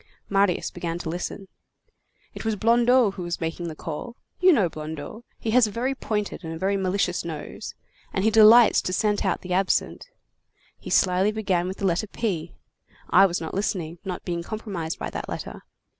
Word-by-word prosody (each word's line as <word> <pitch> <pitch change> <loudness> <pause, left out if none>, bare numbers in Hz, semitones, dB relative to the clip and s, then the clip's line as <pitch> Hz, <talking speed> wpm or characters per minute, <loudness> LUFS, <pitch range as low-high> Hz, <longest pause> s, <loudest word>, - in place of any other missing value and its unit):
Marius 195 -2 +1
began 170 -1 -4
to 175 -2 -5
listen. 180 +3 -5 0.9
"It - - -7
was 220 -1 0
Blondeau 235 +1 +4
who 190 - -8
was 175 0 -3
making 165 +1 -3
the 160 - -6
call. 170 +11 -6 0.2
You 370 0 +6
know 210 - +4
Blondeau, 155 +8 -7
he 220 - -3
has 245 -1 +5
a - - -6
very 250 +6 -1
pointed 210 -7 -3
and 160 0 -6
very 195 +2 +1
malicious 190 -2 0
nose, 160 -3 -7 0.4
and 190 - -1
he 220 - +3
delights 220 +2 +7
to 185 - -3
scent 210 +1 +1
out - - 0
the 180 0 -4
absent. 190 - 0 0.7
He - - -9
slyly 185 +2 +3
began 190 -5 0
with 190 - -5
the 200 - -3
letter 185 +4 +1
P. 185 -7 -3 0.6
I 195 - +7
was 175 -1 -2
not 160 - -6
listening, 175 -4 -2
not 185 -2 -5
being 170 -2 -2
compromised 185 -5 -5
by - - -5
that - - -5
letter. - - -6
190 Hz, 185 wpm, -25 LUFS, 170-215 Hz, 0.9 s, delights